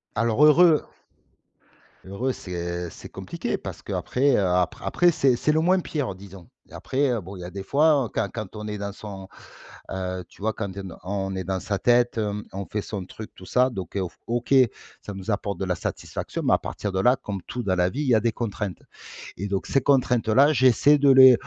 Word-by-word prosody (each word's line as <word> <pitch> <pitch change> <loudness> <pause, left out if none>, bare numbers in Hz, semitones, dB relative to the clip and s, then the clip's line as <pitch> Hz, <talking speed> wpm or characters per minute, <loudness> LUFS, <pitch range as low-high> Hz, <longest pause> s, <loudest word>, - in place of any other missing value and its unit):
Alors 115 +5 +1
heureux 155 +1 +6 1.2
heureux, 115 +8 -2
c'est 85 -3 -5
c'est - - -11
compliqué, - - -4
parce - - -8
qu'après, 135 +1 0
heu, 100 - +2
apr 90 -1 0
après, 175 -1 +3
c'est 135 -4 +3
c'est 150 +5 +1
le 160 - +2
moins 185 +3 +3
pire 145 - -3
disons 95 -2 -13 0.2
et - - -20
après 130 -4 0
bon, 95 +2 -10
il 90 - -9
y - - -7
a 90 - -7
des 95 +1 -6
fois 145 0 +3
quand 110 -3 0
quand 110 -3 -6
on 105 0 -6
est 105 -1 -4
dans 100 0 -4
son 95 -2 -9 0.6
heu, 95 -1 -3
tu - - -19
vois, 110 0 +1
quand 100 -3 -4
tu 100 +1 -7 0.2
on 95 0 -3
est 95 - -3
dans 95 +1 -2
sa 100 0 -3
tête, 120 -1 +3 0.3
on 95 0 -4
fait 105 - -3
son 100 -4 -5
truc 110 +3 -10
tout 95 - -13
ça, 125 +4 +3
donc 95 -2 -7
heu, 95 - 0 0.2
OK, 120 +3 -1 0.5
ça 105 - -7
nous 95 +3 -4
apporte 100 -2 -2
de 95 - -1
la 90 - 0
satisfaction. - - -5
Mais - - +3
à - - +5
partir 105 - -4
de 95 - -1
là, 125 +7 +4
comme 100 -7 -6
tout 125 -1 -4
dans 95 -2 +1
la 90 0 +2
vie, 140 +9 -4
il 145 - -2
y 120 - +6
a - - +5
des 115 +1 +1
contraintes 105 -4 -4 0.6
et 100 - -4
donc 95 -1 -2
ces 135 - +2
contraintes-là, 130 0 +3
j'essaie 130 +3 +5
de 140 -1 +4
les 130 -1 +9
105 Hz, 220 wpm, -24 LUFS, 95-130 Hz, 1.2 s, les